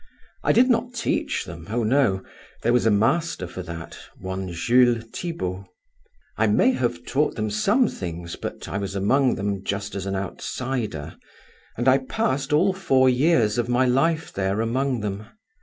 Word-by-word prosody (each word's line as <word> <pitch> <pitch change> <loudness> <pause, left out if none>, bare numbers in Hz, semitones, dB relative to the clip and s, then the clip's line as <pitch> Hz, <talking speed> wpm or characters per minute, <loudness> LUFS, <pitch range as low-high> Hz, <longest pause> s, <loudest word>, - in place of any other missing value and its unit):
I - - +3
did 250 +2 +5
not 245 0 +1
teach 230 - -1
them, 80 +1 -9
oh 115 +2 0
no; 110 -5 +2 0.4
there 120 - +3
was 125 -2 +3
a - - +6
master 110 - +1
for 90 +1 -7
that, 85 -2 -8 0.2
one 95 -1 -5
Jules 120 +6 +3
Thibaut. 100 - -4 0.7
I 110 - +3
may 105 - +4
have 120 - -2
taught 145 +4 0
them 110 -2 -2
some 210 - +3
things, 85 - -6
but - - -6
I 100 - -3
was 100 -1 -4
among 130 +7 +2
them 100 -1 -2
just 100 +1 -3
as 100 -1 -4
an 95 - -2
outsider, 105 - -4 0.6
and 120 +3 -1
I 130 +1 +6
passed 135 -2 -1
all 180 +6 +4
four 135 -9 +3
years 125 -5 +3
of 120 0 -1
my 125 +1 +3
life 160 +6 +1
there 95 +1 -1
among 125 +2 0
them. 105 0 -4
120 Hz, 170 wpm, -24 LUFS, 100-135 Hz, 0.7 s, a